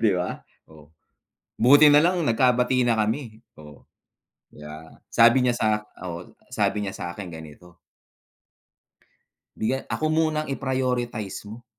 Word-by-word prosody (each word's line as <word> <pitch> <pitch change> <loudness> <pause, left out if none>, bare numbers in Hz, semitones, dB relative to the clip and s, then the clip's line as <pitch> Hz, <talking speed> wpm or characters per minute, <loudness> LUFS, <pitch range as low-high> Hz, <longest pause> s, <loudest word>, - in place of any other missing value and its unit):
'di 110 -3 +3
ba? 90 - -3 0.3
Oh, 75 0 -18 0.7
buti 145 +5 +7
nalang 170 +4 +3
nagkabati 125 +1 +2
na 115 -2 +1
kami. 110 +1 -2 0.2
Oh, 75 -2 -15 0.7
'di 75 - -16
ba, 75 0 -11 0.2
sabi 120 +3 +5
niya, 125 -1 +2
sa - - 0 0.4
oo, 85 0 -8 0.2
sabi 105 -1 -1
niya 95 - -5
sa - - -7
akin 95 0 -8
ganito 80 +2 -13 1.8
Bigya 125 +5 -1
ako 155 - -2
muna 155 -1 0
ang - - -10
i-prioritize 125 -7 -3
mo. 115 +2 -11
115 Hz, 130 wpm, -24 LUFS, 90-130 Hz, 1.8 s, buti